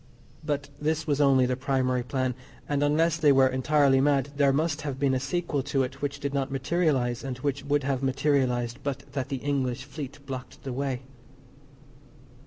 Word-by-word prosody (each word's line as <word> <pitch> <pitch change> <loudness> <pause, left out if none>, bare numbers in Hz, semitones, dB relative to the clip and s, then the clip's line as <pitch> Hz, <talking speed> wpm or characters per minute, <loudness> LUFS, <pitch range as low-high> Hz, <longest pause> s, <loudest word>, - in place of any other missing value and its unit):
But 145 -2 -2
this 155 +1 0
was 145 -1 +1
only 135 -2 +5
the 125 0 0
primary 130 -1 0
plan, 130 +1 -1 0.3
and, 145 -1 0
unless 155 +3 +3
they 155 -3 +5
were 135 -1 +6
entirely 135 +1 +3
mad, 140 0 +2
there 140 -1 +4
must 150 +2 0
have 140 -3 -4
been 140 -1 +2
a 130 - +1
sequel 145 +2 -1
to 135 0 0
it 125 - -6
which 140 -1 -2
did 140 -1 -3
not 135 -1 0
materialise, 135 -4 0
and 130 -2 -4
which 140 +1 -2
would 145 0 +1
have 135 -1 -1
materialised 130 -3 +1
but 140 0 -3
that 135 -2 -3
the 135 - -2
English 130 -3 -1
Fleet 140 0 -7
blocked 130 -2 -7
the 130 - -4
way. 135 -1 -2
140 Hz, 185 wpm, -27 LUFS, 130-145 Hz, 0.3 s, were